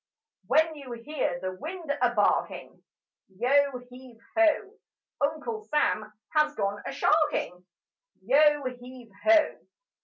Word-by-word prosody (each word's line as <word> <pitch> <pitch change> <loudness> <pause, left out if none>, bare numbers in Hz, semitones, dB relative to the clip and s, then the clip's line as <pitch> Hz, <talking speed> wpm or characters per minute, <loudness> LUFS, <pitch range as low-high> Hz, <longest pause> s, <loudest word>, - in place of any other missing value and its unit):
When 315 +6 +3
you 275 -5 -9
hear 235 -6 -3
the 185 +1 -3
wind 315 - -5
a 245 - +4
barking, 205 - 0 0.6
Yo 275 +3 +2
heave 250 -2 -13 0.2
ho! 335 +6 +2 0.4
Uncle 315 +10 -2
Sam 215 -8 0 0.2
has 305 -1 +2
gone 205 -1 -2
a - - -3
sharking: 290 - +1 0.6
Yo 295 +4 +4
heave 250 -2 -8
ho! 325 -1 +4
280 Hz, 115 wpm, -27 LUFS, 240-310 Hz, 0.6 s, a